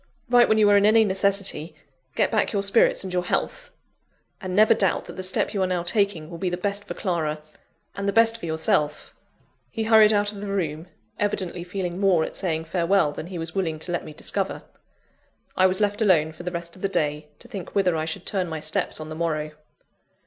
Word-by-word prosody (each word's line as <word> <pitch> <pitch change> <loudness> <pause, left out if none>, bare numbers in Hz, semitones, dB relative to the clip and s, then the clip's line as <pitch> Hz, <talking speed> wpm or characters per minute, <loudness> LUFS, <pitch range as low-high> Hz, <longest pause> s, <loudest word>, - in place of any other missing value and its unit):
Write 245 -1 +6
when 220 - +4
you 215 -1 +5
are 205 0 +6
in 200 - +4
any 220 +1 +6
necessity 195 -5 -1 0.4
get - - +2
back 215 -2 +1
your 200 -2 0
spirits 200 +1 +3
and 185 -1 -6
your 180 - +1
health - - -2 0.7
and 185 -2 -4
never 215 +2 +6
doubt 195 - 0
that - - -10
the - - -5
step 185 +3 0
you 200 - -1
are 185 - +2
now 180 -2 -1
taking 190 -4 0
will 170 0 -9
be 185 - -1
the 175 - -3
best 200 +2 -3
for - - -6
Clara, 160 -5 -2 0.6
and 200 0 -2
the - - +2
best 230 +1 +3
for 170 - -6
yourself!" 160 -2 -1 0.6
He 225 - -3
hurried 220 -1 +6
out 205 -1 +1
of 200 -1 -9
the 205 - -5
room, 170 -4 -3 0.3
evidently 185 -4 -1
feeling 180 0 -4
more 190 -5 +3
at - - -5
saying 160 -4 -2
farewell 175 -2 +2
than 155 - -7
he 180 -1 -7
was 165 -1 -5
willing 170 -5 -1
to 165 +3 -6
let 175 - -2
me - - -9
discover. 190 +5 -3 0.9
I 185 - +5
was 185 +1 -1
left 205 +1 0
alone 165 -7 +3
for 160 - -12
the 180 0 -4
rest 170 -1 -6
of 185 - -15
the 195 - 0
day, 150 -4 -1
to - - -13
think 195 -4 -8
whither 185 -4 +2
I 155 0 -1
should 160 +2 -5
turn 190 -3 -1
my 160 -1 -4
steps 155 +1 -1
on 155 0 -7
the 155 - -6
morrow. 155 -2 -2
185 Hz, 225 wpm, -24 LUFS, 165-200 Hz, 0.9 s, Write